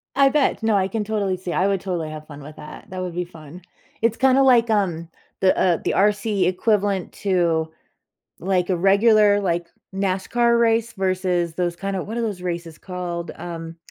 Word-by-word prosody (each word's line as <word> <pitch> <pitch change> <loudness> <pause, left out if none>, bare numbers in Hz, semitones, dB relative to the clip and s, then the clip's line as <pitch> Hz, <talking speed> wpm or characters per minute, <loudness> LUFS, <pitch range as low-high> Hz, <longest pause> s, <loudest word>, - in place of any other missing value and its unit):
I 275 0 +5
bet, 285 -5 +1
no, 220 -1 +2
I 190 -1 +2
can 220 0 -2
totally 205 -3 -1
see, 180 -1 -5
I 190 - +2
would 195 -2 +1
totally 175 -5 -3
have 155 0 -9
fun 145 -1 -10
with 150 +2 -11
that, 150 +5 -11
that 185 -1 -5
would 180 -2 -5
be 180 - -1
fun. 165 0 -13 0.4
It's 230 +1 +1
kinda 265 +1 +4
like, 240 -3 +5
um, 180 -6 0 0.3
the, 190 - +3
uh, 175 -3 +3
the - - 0
RC 205 0 +2
equivalent 200 0 0
to, 170 -5 0 0.7
like, 185 0 0
a 185 - +2
regular, 205 +2 +4
like, 175 -3 -1 0.3
NASCAR 200 +5 +1
race 230 0 +2
versus 185 -3 -1
those 175 -1 -1
kinda 195 0 -3
what 225 +3 -6
are 235 - -1
those 200 -5 -3
races 170 -2 -5
called, 180 -2 -5
um, 165 -1 -7
190 Hz, 185 wpm, -22 LUFS, 175-210 Hz, 0.7 s, I